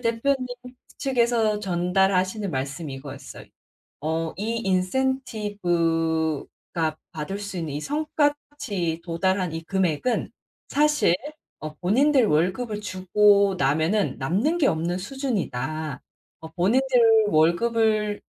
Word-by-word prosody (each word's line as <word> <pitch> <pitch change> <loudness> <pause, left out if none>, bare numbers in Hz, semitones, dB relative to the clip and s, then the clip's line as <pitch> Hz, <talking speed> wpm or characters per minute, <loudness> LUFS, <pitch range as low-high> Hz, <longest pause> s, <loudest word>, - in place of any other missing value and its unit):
대표님 250 +3 0 0.5
측에서 235 -5 +1
전달하시는 190 +2 +1
말씀이 140 +1 -4
이거였어요. 135 +1 -9 0.6
어 160 +2 -2
"이 225 +3 -2
인센티브가 175 - -1 0.2
받을 160 +6 -4
수 200 -3 -6
있는 155 -4 -4
이 145 - -3
성과치 290 - -1
도달한 185 0 0
이 165 0 -5
금액은 190 +5 0 0.4
사실 295 - +3 0.5
어 155 0 -6
본인들 260 +7 +3
월급을 200 +7 0
주고 200 +1 +3
나면은 160 +9 +1
남는 210 - 0
게 285 - +3
없는 170 +3 -1
수준이다." 160 - -3 0.4
어 160 - -9
본인들 225 +2 +4
월급을 210 +6 +2
190 Hz, 235 characters per minute, -24 LUFS, 165-230 Hz, 0.6 s, 본인들